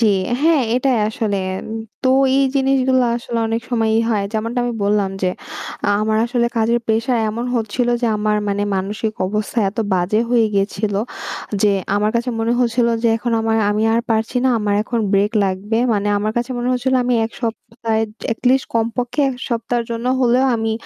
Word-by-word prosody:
জি, 230 Hz, -, +4 dB, 0.4 s
হ্যাঁ, 320 Hz, -2 st, +4 dB
এটাই 255 Hz, -1 st, +2 dB
আসলে। 215 Hz, -2 st, -2 dB, 0.7 s
তো 260 Hz, -, +2 dB, 0.3 s
এই 275 Hz, -, +4 dB
জিনিসগুলো 265 Hz, -1 st, +2 dB
আসলে 235 Hz, 0 st, -4 dB
অনেক 225 Hz, +1 st, -1 dB
সময়ই 225 Hz, -2 st, +2 dB
হয়। 210 Hz, -3 st, +1 dB
যেমনটা 230 Hz, +3 st, -2 dB
আমি 245 Hz, -, -1 dB
বললাম 200 Hz, -1 st, +1 dB
যে -, -, +2 dB, 0.7 s
আমার 215 Hz, 0 st, +1 dB
আসলে 235 Hz, 0 st, +1 dB
কাজের 230 Hz, +1 st, +2 dB
প্রেশার 230 Hz, +2 st, +1 dB
এমন 230 Hz, +3 st, -3 dB
হচ্ছিলো 235 Hz, +2 st, 0 dB
যে -, -, +3 dB
আমার 210 Hz, 0 st, +1 dB
মানে 200 Hz, 0 st, 0 dB
মানসিক 205 Hz, +3 st, -2 dB
অবস্থা 210 Hz, +4 st, -2 dB
এত 215 Hz, -, -17 dB, 0.2 s
বাজে 185 Hz, +4 st, +1 dB
হয়ে 240 Hz, -2 st, +4 dB
গিয়েছিলো, 200 Hz, +1 st, 0 dB, 0.6 s
যে 210 Hz, -, +5 dB, 0.3 s
আমার 210 Hz, +1 st, +1 dB
কাছে 240 Hz, +2 st, -1 dB
মনে 225 Hz, +1 st, +1 dB
হচ্ছিল 240 Hz, 0 st, +2 dB, 0.2 s
যে 235 Hz, -, +3 dB
এখন 235 Hz, +1 st, -2 dB
আমার 225 Hz, 0 st, +1 dB
আমি 210 Hz, +1 st, 0 dB
আর 230 Hz, -, +3 dB
পারছি 225 Hz, +2 st, 0 dB
না। -, -, +4 dB
আমার 210 Hz, -1 st, 0 dB
এখন 235 Hz, +2 st, -2 dB
ব্রেক 200 Hz, +2 st, +2 dB
লাগবে 195 Hz, +4 st, -1 dB
মানে 205 Hz, -1 st, 0 dB
আমার 215 Hz, +1 st, -1 dB
কাছে 240 Hz, +2 st, -1 dB
মনে 240 Hz, +1 st, -1 dB
হচ্ছিলো 260 Hz, +1 st, +1 dB
আমি 245 Hz, 0 st, +1 dB
এক 225 Hz, -, -4 dB
সপ্তাহে, 225 Hz, -1 st, -2 dB, 0.3 s
এটলিস্ট 255 Hz, +3 st, +1 dB
কমপক্ষে 235 Hz, +4 st, -1 dB
এক 265 Hz, -, -3 dB
সপ্তাহের 235 Hz, 0 st, -1 dB
জন্য 230 Hz, +1 st, -3 dB
হলেও 250 Hz, +1 st, +3 dB
আমি 225 Hz, -1 st, -1 dB
230 Hz, 175 wpm, -19 LUFS, 215-245 Hz, 0.7 s, যে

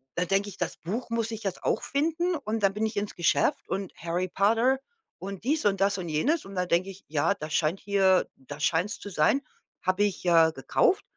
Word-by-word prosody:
da 180 Hz, -, +1 dB
denke 195 Hz, +3 st, +1 dB
ich: 185 Hz, -, -11 dB
„Das 175 Hz, -, -3 dB
Buch 220 Hz, +10 st, -4 dB
muss 230 Hz, -1 st, -1 dB
ich 225 Hz, -1 st, -6 dB
jetzt 195 Hz, -3 st, -4 dB
auch -, -, +1 dB
finden“, 330 Hz, +5 st, 0 dB
und 225 Hz, -7 st, -3 dB
da 195 Hz, -, +6 dB
bin 210 Hz, +3 st, -2 dB
ich 220 Hz, -1 st, -4 dB
ins 205 Hz, 0 st, -2 dB
Geschäft 175 Hz, -2 st, +1 dB
und 195 Hz, -2 st, -3 dB
Harry 170 Hz, +2 st, -2 dB
Potter 230 Hz, +8 st, +3 dB, 0.4 s
und 195 Hz, +1 st, -7 dB
dies 300 Hz, +1 st, +1 dB
und 195 Hz, -2 st, +2 dB
das 200 Hz, 0 st, +3 dB
und 175 Hz, -, -5 dB
jenes 280 Hz, -, +1 dB
und 195 Hz, -, -10 dB
da 180 Hz, 0 st, 0 dB
denke 180 Hz, +3 st, +1 dB
ich: 195 Hz, 0 st, -11 dB
„Ja, 150 Hz, +5 st, +1 dB
da 155 Hz, -4 st, -7 dB
scheint 160 Hz, +4 st, +1 dB
hier 195 Hz, -2 st, +3 dB
da 145 Hz, +2 st, -10 dB
scheint's 170 Hz, +6 st, 0 dB
zu 205 Hz, -, -7 dB
sein“, 195 Hz, -, +2 dB, 0.4 s
habe 185 Hz, +2 st, +2 dB
ich, 205 Hz, -2 st, -1 dB
äh, 165 Hz, -2 st, +5 dB
gekauft. 390 Hz, +2 st, +2 dB
195 Hz, 220 wpm, -27 LUFS, 175-220 Hz, 0.4 s, da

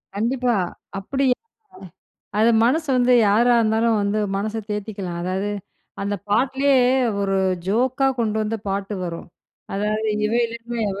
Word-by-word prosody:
கண்டிப்பா. 245 Hz, +3 st, 0 dB, 0.5 s
அப்டி 270 Hz, +8 st, -1 dB
அ -, -, -63 dB, 1.0 s
அத 225 Hz, +2 st, +5 dB
மனசு 305 Hz, +6 st, +1 dB
வந்து 250 Hz, 0 st, +3 dB, 0.2 s
யாரா 235 Hz, +4 st, +4 dB
இருந்தாலும் 225 Hz, +1 st, +2 dB
வந்து 200 Hz, +1 st, 0 dB, 0.2 s
மனச 210 Hz, +2 st, -2 dB, 0.2 s
தேத்திக்கலாம். 200 Hz, -4 st, -4 dB
அதாவது 190 Hz, +3 st, -2 dB, 0.5 s
அந்த 200 Hz, +1 st, -1 dB
பாட்டுலே 265 Hz, +6 st, +2 dB, 0.5 s
ஒரு 195 Hz, -1 st, 0 dB, 0.3 s
ஜோக்கா 255 Hz, +6 st, +1 dB
கொண்டு 220 Hz, -2 st, 0 dB
வந்து 215 Hz, +1 st, -2 dB
பாட்டு 195 Hz, +1 st, -2 dB
வரும். 170 Hz, 0 st, -6 dB, 0.5 s
அதாவது 210 Hz, +2 st, -1 dB, 0.2 s
இவ 215 Hz, -, -2 dB
இல்லனா, 230 Hz, +1 st, -7 dB
அவ 195 Hz, -, -6 dB
220 Hz, 130 wpm, -22 LUFS, 200-245 Hz, 1.0 s, அத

